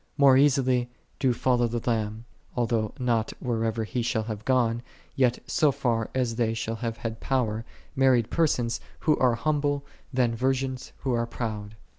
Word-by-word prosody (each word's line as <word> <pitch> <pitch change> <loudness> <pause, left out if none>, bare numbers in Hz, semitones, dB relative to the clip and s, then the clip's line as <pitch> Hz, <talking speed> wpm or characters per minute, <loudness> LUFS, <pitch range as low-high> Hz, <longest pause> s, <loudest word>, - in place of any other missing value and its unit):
More 140 -2 +7
easily 130 -3 +3 0.3
do 130 - +3
follow 120 0 +2
the 115 0 -4
Lamb, 110 -1 -1 0.3
although 115 -3 0
not 120 -4 0
whithersoever 115 -2 -1
He 120 +3 -2
shall 115 -1 0
have 110 -1 -5
gone, 120 -3 +2 0.3
yet 125 -2 +3
so 155 -4 +3
far 120 -5 -1
as 120 -3 0
they 115 -2 +1
shall 115 0 -3
have 115 -1 -3
had 115 -1 -5
power, 115 -5 0 0.3
married 130 -4 +3
persons 125 -8 +1 0.2
who 155 - +3
are 125 -2 +4
humble, 145 0 0 0.3
than 125 -3 +2
virgins 130 +1 -1
who 130 -2 0
are 115 0 0
proud. 110 -3 -5
120 Hz, 160 wpm, -27 LUFS, 115-130 Hz, 0.3 s, More